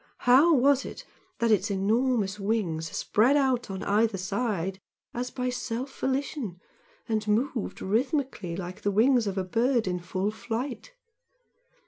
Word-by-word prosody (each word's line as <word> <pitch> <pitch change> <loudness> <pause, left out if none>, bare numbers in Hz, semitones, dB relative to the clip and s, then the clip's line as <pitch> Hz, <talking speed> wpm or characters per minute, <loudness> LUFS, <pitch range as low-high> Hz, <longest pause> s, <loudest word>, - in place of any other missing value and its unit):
How 265 +7 +7
was 280 -1 +4
it - - -8 0.3
that 235 -1 +1
its 215 - +2
enormous 210 +1 +1
wings 190 -7 -1
spread 245 - +2
out 255 -5 +1
on 190 0 -5
either 215 0 +2
side 195 -1 -2 0.3
as 250 +1 -3
by 250 -1 -2
self 245 +2 -4
volition 265 - -2 0.5
and 215 -2 -1
moved 230 +2 -1
rhythmically 240 - -1
like 180 0 -6
the 205 - +1
wings 230 +3 +3
of 195 0 -3
a 190 - +1
bird 230 +4 +1
in 180 -1 -1
full 185 +3 -2
flight? 245 - -5
225 Hz, 140 wpm, -27 LUFS, 195-255 Hz, 0.5 s, How